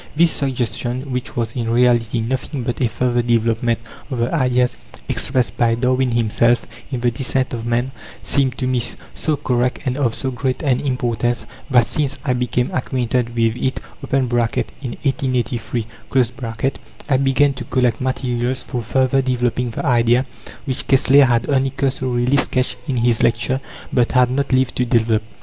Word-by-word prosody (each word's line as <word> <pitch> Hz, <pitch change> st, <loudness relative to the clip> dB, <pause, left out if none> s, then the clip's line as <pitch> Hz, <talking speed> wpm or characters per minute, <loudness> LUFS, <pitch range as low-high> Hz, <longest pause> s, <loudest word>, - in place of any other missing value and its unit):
This 165 Hz, +1 st, +4 dB
suggestion 130 Hz, 0 st, -2 dB
which 125 Hz, 0 st, -4 dB
was, 115 Hz, -2 st, -1 dB
in 115 Hz, -1 st, -3 dB
reality, 120 Hz, -1 st, +3 dB
nothing 130 Hz, +3 st, -3 dB
but 120 Hz, +1 st, -3 dB
a 120 Hz, -, +2 dB
further 120 Hz, +1 st, +1 dB
development 115 Hz, 0 st, +1 dB, 0.3 s
of 130 Hz, -, -3 dB
the 120 Hz, +5 st, 0 dB
ideas 125 Hz, -4 st, +2 dB, 0.3 s
expressed 130 Hz, -2 st, 0 dB
by 115 Hz, -1 st, +3 dB
Darwin 130 Hz, +1 st, +1 dB
himself 120 Hz, +1 st, +2 dB, 0.3 s
in 125 Hz, -3 st, -2 dB
The 120 Hz, 0 st, +2 dB
Descent 130 Hz, +2 st, -1 dB
of 115 Hz, -1 st, -4 dB
Man 120 Hz, +2 st, 0 dB, 0.3 s
seemed 135 Hz, -3 st, +1 dB
to 130 Hz, -, -2 dB
me 125 Hz, -1 st, +1 dB, 0.3 s
so 155 Hz, -2 st, -1 dB
correct 125 Hz, -2 st, 0 dB
and 130 Hz, 0 st, -1 dB
of 120 Hz, -5 st, +1 dB
so 130 Hz, -, -3 dB
great 130 Hz, +4 st, -2 dB
an 130 Hz, -4 st, +2 dB
importance, 120 Hz, -3 st, -1 dB, 0.2 s
that 125 Hz, -3 st, +5 dB
since 145 Hz, +1 st, -1 dB
I 130 Hz, -, +2 dB
became 125 Hz, 0 st, 0 dB
acquainted 125 Hz, -2 st, -1 dB
with 115 Hz, -1 st, +2 dB
it 130 Hz, +1 st, -1 dB, 0.3 s
(in 135 Hz, -2 st, +2 dB
1883) 120 Hz, 0 st, -1 dB, 1.2 s
I 140 Hz, -3 st, +3 dB
began 135 Hz, +1 st, +3 dB
to 130 Hz, -1 st, -7 dB
collect 125 Hz, -3 st, +1 dB
materials 125 Hz, -1 st, -1 dB
for 120 Hz, -, -4 dB
further 130 Hz, +3 st, +2 dB
developing 125 Hz, -1 st, 0 dB
the 115 Hz, -, -5 dB
idea, 120 Hz, 0 st, +3 dB, 0.4 s
which 130 Hz, -3 st, -3 dB
Kessler 135 Hz, +1 st, +6 dB
had 120 Hz, -2 st, +1 dB
only 135 Hz, -2 st, +2 dB
cursorily 130 Hz, -1 st, 0 dB
sketched 130 Hz, -2 st, 0 dB
in 135 Hz, -4 st, -1 dB
his 120 Hz, -1 st, +2 dB
lecture, 120 Hz, +3 st, +1 dB, 0.3 s
but 120 Hz, -2 st, +2 dB
had 125 Hz, -1 st, +4 dB
not 140 Hz, +1 st, -1 dB
lived 130 Hz, -1 st, +2 dB
to 125 Hz, -, +2 dB
develop. 115 Hz, -2 st, +2 dB
125 Hz, 160 wpm, -20 LUFS, 120-130 Hz, 1.2 s, Kessler